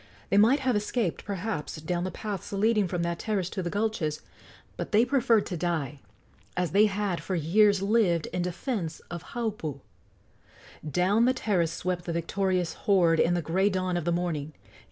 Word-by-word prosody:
They 195 - +4
might 235 +7 +5
have 260 -3 +1
escaped, 210 -2 -1
perhaps, 200 -4 -3
down 175 +3 -2
the - - -2
paths 200 0 -5
leading 210 0 +2
from 175 -1 -2
that 170 0 -2
terrace 195 -5 -1
to 190 - -3
the 175 - -3
gulches; 200 -7 -1 0.5
but - - -5
they 220 +3 +5
preferred 240 -5 +3
to 180 - -4
die, 155 -4 -2 0.6
as 180 -3 0
they 210 +4 +5
had 200 -3 -2
for 190 - -3
years 200 +5 +3
lived, 195 -6 +2
in 180 - -1
defence 180 - -3
of 170 -1 -5
Haupu. 210 - -3 1.0
Down 185 +9 +2
the 255 +1 +3
terrace 175 -9 0
swept 180 0 -3
the 170 - -3
victorious 180 +1 0 0.2
horde 170 -5 +4
in 175 - +3
the 175 - -1
gray 190 +6 +2
dawn 185 -2 -1
of 175 -2 -2
the 175 - +1
morning. 165 -4 -2
185 Hz, 175 wpm, -28 LUFS, 170-210 Hz, 1.0 s, might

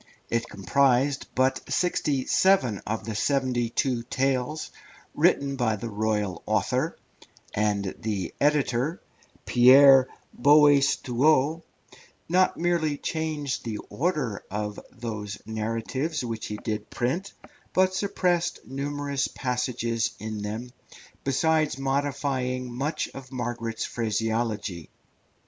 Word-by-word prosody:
It 115 0 0
comprised 135 +7 +2
but 130 +1 +2
sixty 150 -6 0
seven 140 - +3
of 110 +2 -2
the 110 - -3
seventy 125 +1 0
two 125 0 0
tales 135 +4 -1 0.4
written 140 -1 +2
by 115 -4 +1
the 115 +2 -6
royal 105 -3 -1
author, - - 0 0.6
and 100 -2 0
the 100 -5 -3
editor, 145 0 +1 0.5
Pierre 130 +1 +7 0.3
Boaistuau, 145 +1 +4 0.7
not 185 +2 +3
merely 165 -4 +1
changed 155 -4 -3
the 110 -3 -4
order 145 - -1
of 105 +1 -4
those 110 -4 -5
narratives 115 +7 -2
which 115 -2 -4
he 105 - -4
did 110 0 -4
print, 170 +11 -2 0.4
but 185 0 +3
suppressed 180 -3 0
numerous 140 0 -2
passages 120 -3 -1
in 110 0 -5
them, 110 +4 -5 0.5
besides 155 +1 +1
modifying 135 -2 -1
much 140 +6 -2
of 135 -1 -10
Margaret's 120 -3 -3
phraseology. 110 -5 -2
130 Hz, 105 wpm, -26 LUFS, 110-145 Hz, 0.7 s, Pierre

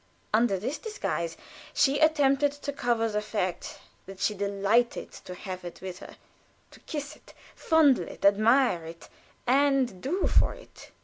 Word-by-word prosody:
Under 220 -2 +3
this 245 +10 -4
disguise 170 - -3 0.4
she 275 +1 +3
attempted 290 -2 +3
to 290 0 -6
cover 235 -4 0
the 210 -1 -1
fact 205 -4 -3 0.3
that 195 0 -10
she 210 - +1
delighted 200 +4 0
to 180 - -10
have 185 0 -7
it 175 - -8
with 185 -1 -7
her, - - -11 0.6
to - - -16
kiss 295 -1 -6
it, - - -19 0.2
fondle 310 -6 +3
it, - - -7
admire 215 -1 +4
it, 165 +1 -11 0.4
and 265 -6 +2
"do 360 +8 -1
for - - +2
it." - - -15
235 Hz, 150 wpm, -27 LUFS, 195-285 Hz, 0.6 s, admire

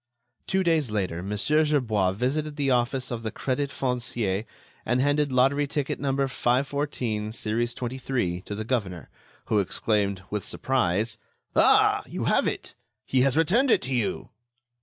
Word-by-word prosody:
Two 190 0 +1
days 160 -7 +2
later, 95 -5 -2
Mon. 100 +3 -4
Gerbois 125 -9 +2
visited 145 +8 -1
the 140 -2 0
office 125 +1 0
of 120 -2 -3
the 110 -1 -4
Crédit 140 +2 -2
Foncier 120 -6 -1 0.4
and 125 +2 +1
handed 145 +1 +2
lottery 135 +3 +3
ticket 140 -1 -2
number 135 0 0
514, 125 -4 -1
series 115 +2 -1
23, 120 -8 -2
to 105 - -6
the 110 +1 -4
governor, 100 - -3 0.3
who 105 - +2
exclaimed, 100 0 0
with 105 -1 -2
surprise: 110 -3 0 0.4
"Ah! - - +5
you - - -4
have - - +2
it! - - -4 0.3
He 130 - +2
has 135 +2 +2
returned 215 - +3
it - - +4
to 130 +1 -2
you!" 120 -5 -2
125 Hz, 150 wpm, -26 LUFS, 105-140 Hz, 0.4 s, Ah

